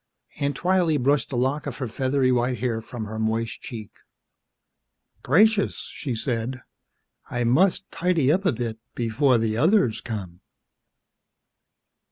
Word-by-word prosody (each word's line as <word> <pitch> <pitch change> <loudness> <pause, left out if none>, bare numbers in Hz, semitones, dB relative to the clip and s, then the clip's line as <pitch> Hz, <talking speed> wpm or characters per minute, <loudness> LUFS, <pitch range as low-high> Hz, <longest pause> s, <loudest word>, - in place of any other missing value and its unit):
Aunt 140 0 0
Twylee 180 -3 +2
brushed 140 +2 +1
a - - -2
lock 135 +4 0
of - - -5
her 130 - -3
feathery 130 +2 +1
white 125 0 +1
hair 115 -1 -1
from 115 -1 -7
her 110 +1 -6
moist 110 +1 -1
cheek. 110 -4 -8 1.3
"Gracious," 215 -1 +3
she 130 -6 -4
said, 120 +2 -3 0.7
"I 120 0 -1
must 175 +12 +3
tidy 165 -5 +2
up 185 +5 +1
a 190 - +3
bit 115 -2 -4 0.2
before 120 +3 +2
the 110 -1 0
others 155 - +3
come." 95 -6 -6
125 Hz, 135 wpm, -24 LUFS, 115-150 Hz, 1.3 s, Gracious